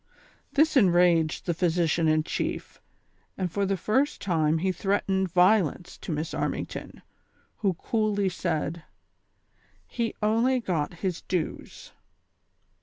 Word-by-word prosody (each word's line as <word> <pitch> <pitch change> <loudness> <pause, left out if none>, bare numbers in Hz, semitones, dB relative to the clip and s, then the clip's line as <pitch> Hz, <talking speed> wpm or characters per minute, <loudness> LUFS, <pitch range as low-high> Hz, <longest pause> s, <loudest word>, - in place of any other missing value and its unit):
This 310 +2 +3
enraged 175 - +3
the 175 - 0
physician 170 -1 +1
in 155 0 +3
chief, - - -4 0.6
and 185 -3 -2
for 200 +2 0
the 195 0 0
first 260 - 0
time 160 -4 +1
he 185 +3 0
threatened 190 0 0
violence 180 -2 +2
to - - -6
Miss 155 +2 -3
Armington, - - -4 0.5
who 195 -4 0
coolly 210 0 0
said: 170 -2 -2 1.1
''He 230 -2 -3
only 230 +5 +2
got 170 -10 -2
his 180 -3 -2
dues." 180 -4 -4
180 Hz, 115 wpm, -27 LUFS, 165-205 Hz, 1.1 s, This